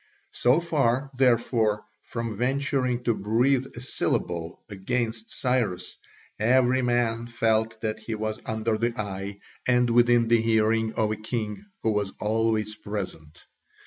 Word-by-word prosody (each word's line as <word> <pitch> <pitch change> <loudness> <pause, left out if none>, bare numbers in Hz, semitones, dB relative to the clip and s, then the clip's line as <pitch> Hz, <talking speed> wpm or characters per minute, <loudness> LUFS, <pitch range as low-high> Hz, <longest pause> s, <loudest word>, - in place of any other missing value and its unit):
So 125 +6 +3
far, 140 -5 +1
therefore, 115 -4 +2 0.2
from 115 -2 -4
venturing 130 0 0
to 120 - +2
breathe 125 +6 +2
a 120 - -7
syllable 85 -9 -2
against 115 +2 -3
Cyrus, 115 -8 -1 0.4
every 125 +3 +4
man 120 -1 +1
felt 110 -1 +1
that 110 -1 -2
he 115 - -4
was 110 0 -3
under 110 0 -1
the 115 0 -1
eye 100 -1 -4 0.3
and 125 -1 +3
within 120 0 +5
the 115 0 +4
hearing 110 0 +2
of 110 -1 +1
a - - 0
king 110 - -4 0.2
who 110 - +2
was 105 -2 -1
always 110 0 +1
present. 90 -8 -6
115 Hz, 135 wpm, -26 LUFS, 110-120 Hz, 0.4 s, within